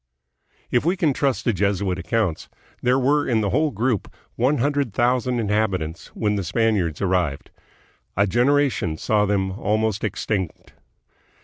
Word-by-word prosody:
If 120 - +2
we 175 +5 +1
can 155 -5 +2
trust 135 -1 0
the 120 - +2
Jesuit 95 -1 0
accounts, 90 -1 -1 0.3
there 125 +1 +3
were 145 +3 +2
in 115 -3 +2
the 100 -2 0
whole 155 0 +2
group 120 -3 -1 0.2
one 130 +5 +2
hundred 140 -4 0
thousand 125 0 +1
inhabitants 100 -7 -1
when 105 -1 0
the 100 - -2
Spaniards 100 -4 0
arrived. 90 -7 -1 0.7
A 100 - +4
generation 120 - +1
saw 105 +3 +1
them 95 -2 0
almost 110 +1 -1
ex 105 -3 -3
tinct. 95 -6 -3
110 Hz, 145 wpm, -23 LUFS, 95-125 Hz, 0.7 s, A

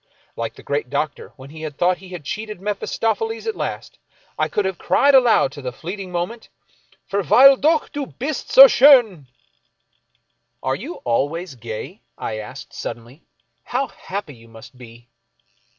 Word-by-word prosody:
Like 115 0 -5
the - - -14
great 145 -3 -2
Doctor, 145 +2 -3
when 135 0 -13
he 155 0 -6
thought 175 +5 0
he 190 0 -13
had 175 -6 -9
cheated 215 +3 -5
Mephistopheles 225 - -2
at 445 - -2
last, - - -6 0.4
I - - 0
could 210 - -1
have 190 -2 -3
cried 285 0 +3
aloud 245 - +5
to 145 - -10
the 125 -1 -4
fleet 180 +10 -7
ing 190 -2 -7
moment, 180 +7 -4 0.6
Verweile 220 - +6
dock, 310 +4 +1
du 290 -2 -5
hist 275 +2 -4
so 270 - +10
sch'dn! 240 - +5 0.7
" - - -47
Are 130 +1 0
you 280 - -7
always 145 +8 -1
gay? 120 - -8
" - - -51
I 110 -1 -4
asked, 105 - -10
suddenly, 120 +6 -8 0.2
" - - -50
How 265 +2 0
happy 195 -6 -7
you 115 -2 -17
must 115 +2 -14
be 120 -1 -15
180 Hz, 165 wpm, -21 LUFS, -, 0.7 s, so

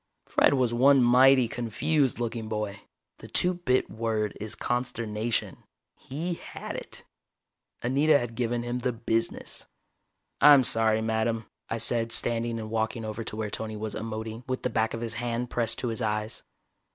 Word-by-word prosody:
Fred - - +3
was 125 -3 +1
one 135 +2 +5
mighty 130 +1 +6
confused 125 +5 0
looking 115 -1 -3
boy. 105 -2 -3 0.4
The - - -10
two 180 +1 +3
bit 130 -8 0
word 110 -2 -2
is 110 +1 -4
consternation. 115 -2 -2 0.4
He 160 +7 -4
had - - -8
it. - - -7 0.8
Anita 145 +5 +4
had 120 -3 -4
given 120 0 -1
him 120 +1 -3
the 125 0 -1
business. 115 0 -2 0.7
"I'm 145 -2 +8
sorry, 110 -2 +3
madame," 110 0 -1 0.2
I 115 - -1
said 115 0 +1
standing 115 0 +2
and 110 -1 -6
walking 110 +1 -1
over 110 +1 -4
to 105 - -6
where 110 -1 -3
Tony 110 -1 -4
was 110 0 -4
emoting, 110 +1 -5
with 130 0 -3
the 125 - -1
back 110 0 0
of 115 - -6
his 115 -1 -4
hand 120 0 -3
pressed 115 -2 0
to 125 - -2
his 115 +2 -3
eyes. 105 0 -2
115 Hz, 165 wpm, -27 LUFS, 110-125 Hz, 0.8 s, I'm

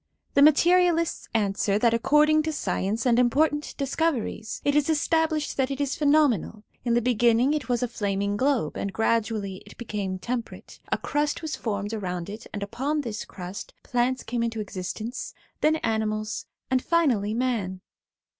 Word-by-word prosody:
' - - -47
The 280 - +4
materialists 335 +2 +4
answer, 200 -2 +1
that 230 +1 +3
according 300 +6 +4
to 315 +1 -2
science 205 - -2
and 240 -1 +4
important 295 +4 +2
discoveries, 275 -6 -1
it 285 - +2
is 295 +1 +2
established 315 0 +1
that 265 -1 +1
it 275 0 -4
is 280 -2 0
pheno 300 0 +5
menal; 215 - -3 0.2
in 235 -1 +1
the 240 - +2
beginning 240 +2 +3
it 295 -4 -3
was 245 0 +1
a - - +1
flartaing 200 -3 -1
globe, 255 - 0
and 200 - -2
gradually 215 -2 0
it - - -15
became 205 -5 -3
temperate; 235 +5 -5
a - - +2
crust 295 +2 -1
was 315 - -3
formed 205 -1 -3
around 180 -3 -4
it, 220 +2 -9
and 205 - -4
upon 270 +9 -1
this 225 -6 -5
crust 185 +1 -8
plants 250 +1 0
came 240 0 -2
into 230 -1 -2
exist 185 -3 -5
ence, 235 +4 -5 0.2
then 310 +1 +3
animals, 215 -1 -1 0.2
and 255 -1 +2
finally 240 -12 +2
man. 220 -7 -1
235 Hz, 170 wpm, -26 LUFS, 210-290 Hz, 0.2 s, pheno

